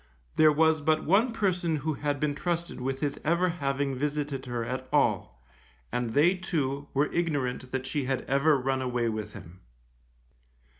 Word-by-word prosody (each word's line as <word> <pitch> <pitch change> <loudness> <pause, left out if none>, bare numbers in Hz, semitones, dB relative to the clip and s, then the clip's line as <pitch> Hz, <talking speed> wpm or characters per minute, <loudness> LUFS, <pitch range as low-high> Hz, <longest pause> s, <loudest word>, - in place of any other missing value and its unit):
There 155 -1 +6
was 160 +1 +3
but 155 +1 +2
one 210 - +3
person 180 -7 0
who 155 +2 -1
had 145 -1 -2
been 150 0 0
trusted 170 -1 -3
with 135 +1 -2
his 145 -2 -1
ever 170 +3 +2
having 140 -4 -1
visited 145 -1 -2
her 120 -2 -2
at 130 +2 -4
all, 60 - +1 0.5
and 120 -1 -2
they 160 +6 +5
too, 145 -6 -2
were 145 +2 +1
ignorant 140 -7 -1
that 130 0 -3
she 140 0 -2
had 130 0 -1
ever 140 +2 +3
run 130 0 -1
away 120 -2 0
with 110 -1 -4
him. 85 +3 -11
145 Hz, 165 wpm, -28 LUFS, 130-160 Hz, 0.5 s, There